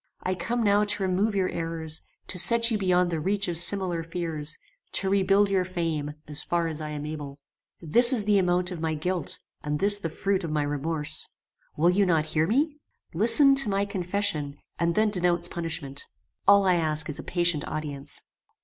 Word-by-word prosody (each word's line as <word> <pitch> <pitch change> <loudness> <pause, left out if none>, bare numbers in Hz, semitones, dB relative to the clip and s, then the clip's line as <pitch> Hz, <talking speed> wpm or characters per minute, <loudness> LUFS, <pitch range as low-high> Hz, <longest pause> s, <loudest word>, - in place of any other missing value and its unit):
I 185 - -1
come 230 +6 -3
now 205 0 +2
to 210 -1 -1
remove 195 +3 -1
your 190 -2 0
errors; 165 -1 -5 0.2
to 180 - -3
set 235 +4 +3
you 220 - 0
beyond 180 -2 +1
the 165 - -2
reach 195 +5 -1
of 170 -2 0
similar 180 -2 +4
fears; 165 -2 -5 0.4
to 190 0 -1
rebuild 195 +1 +2
your 190 -2 +1
fame 165 -5 -4
as 150 0 -3
far 170 -1 -1
as 160 -1 -5
I 155 - -6
am 150 -1 -6
able. 145 -2 -8 0.4
"This 235 - +8
is 225 -6 +3
the 205 -1 +3
amount 180 0 0
of 175 - -7
my 160 -1 -2
guilt, 175 +1 -3 0.3
and 150 0 -3
this 205 +4 +2
the 165 - -4
fruit 195 +4 -2
of 165 - -4
my 150 -1 -1
remorse. 145 +1 -3 0.5
Will 170 +4 +3
you 195 +1 +1
not 160 -3 +1
hear 155 0 -1
me? 290 - 0 0.4
Listen 240 - +6
to 275 -5 +7
my 200 0 0
confession, 180 -7 -2 0.2
and 170 0 0
then 215 0 +1
denounce 175 -2 +2
punishment. 160 -5 -4 0.4
All 200 0 +5
I 180 -2 +2
ask 155 -2 0
is 150 - -3
a - - -7
patient 170 -4 0
audience." 145 -2 -4
175 Hz, 195 wpm, -25 LUFS, 155-200 Hz, 0.5 s, This